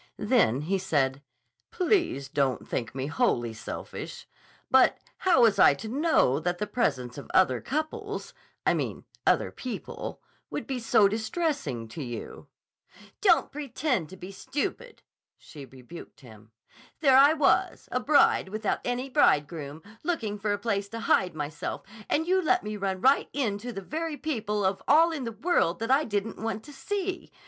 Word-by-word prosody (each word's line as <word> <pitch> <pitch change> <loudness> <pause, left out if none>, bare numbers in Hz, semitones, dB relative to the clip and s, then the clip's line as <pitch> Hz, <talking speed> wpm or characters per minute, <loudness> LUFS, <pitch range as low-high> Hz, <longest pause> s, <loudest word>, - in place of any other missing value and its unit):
Then 210 - +2
he 190 +6 -1
said: 140 -7 0 0.5
"Please 350 - +1
don't 140 -2 -1
think 115 +1 -3
me 135 0 -2
wholly 120 -5 0
selfish. 110 - -7 0.4
But 260 0 +5 0.2
how 345 -10 +4
was 210 -4 +4
I 140 - +7
to 180 - -8
know 260 - +2
that 175 +2 -1
the 210 - -2
presence 135 - -1
of - - -11
other 130 -10 +4
couples—I 410 +9 -4
mean - - -3 0.2
other - - +3
people—would 255 -2 -7
be 265 -3 -3
so 215 -3 +4
distressing 220 - -2
to 150 - -7
you?" 120 -2 -7 0.7
"Don't 360 -6 +4
pretend 270 - -2
to 190 - -11
be 185 +2 -9
stupid," 295 - -5 0.3
she 145 -3 -11
rebuked 135 +6 -12
him. 110 -4 -15 0.5
"There 270 -4 +5
I 280 +3 +7
was, 305 - +1
a 250 - +1
bride 275 -6 +3
without 215 +1 -1
any 245 +2 -2
bridegroom, 150 - +1 0.2
looking 225 -12 -2
for 205 +1 -1
a 205 - +1
place 200 -2 -2
to 230 +1 -6
hide 180 -5 +2
myself 150 0 -4 0.3
and 320 - +1
you 375 +2 +2
let 365 +2 +2
me 210 0 -4
run 190 -2 -3
right 270 +5 +4
into 235 -3 -2
the 195 - -6
very 315 - -4
people 215 -10 -2
of 190 0 0
all 325 +4 +6
in 290 -6 -4
the 230 - -3
world 220 - +1
that 230 +3 -2
I 285 +3 +4
didn't 210 +1 -3
want 220 -1 -3
to 290 - -12
see. 380 +5 -4
215 Hz, 160 wpm, -27 LUFS, -, 0.7 s, I